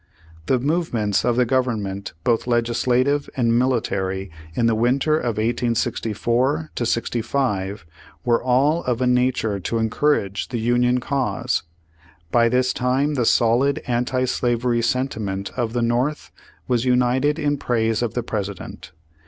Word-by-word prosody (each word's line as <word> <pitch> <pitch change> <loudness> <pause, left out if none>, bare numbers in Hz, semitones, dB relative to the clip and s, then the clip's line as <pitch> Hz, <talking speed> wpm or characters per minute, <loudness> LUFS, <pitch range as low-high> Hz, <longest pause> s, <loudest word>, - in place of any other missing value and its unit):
The 130 - +3
movements 125 - 0
of 120 -1 +1
the 125 0 +3
Government 110 -6 -1
both 120 0 +1
legis 120 -1 0
lative 130 +3 +2
and 115 -2 +2
military, 95 -7 -1 0.2
in 120 - +1
the 115 - +3
winter 130 +7 +2
of 120 -8 -1
1864 120 +5 0
65, 115 -5 -1 0.4
were 120 -1 +2
all 140 +6 +2
of 125 -2 0
a 130 - +1
nature 125 -4 +1
to 95 +5 -2
encourage 110 -3 0
the 125 - -4
Union 120 +2 +2
cause. 135 +1 -1 0.7
By 115 -1 +4
this 125 +1 +1
time 130 +4 0
the 125 -4 0
solid 125 +4 +3
anti 125 +1 0
slavery 120 -1 0
sentiment 110 -6 -2
of 115 -3 -2
the 120 -1 0
North 125 +6 -1 0.4
was 120 -2 +1
united 130 +4 +2
in 145 -2 0
praise 115 -3 0
of 120 -2 -2
the 120 - -1
President. 100 -7 -6
120 Hz, 135 wpm, -22 LUFS, 115-130 Hz, 0.7 s, By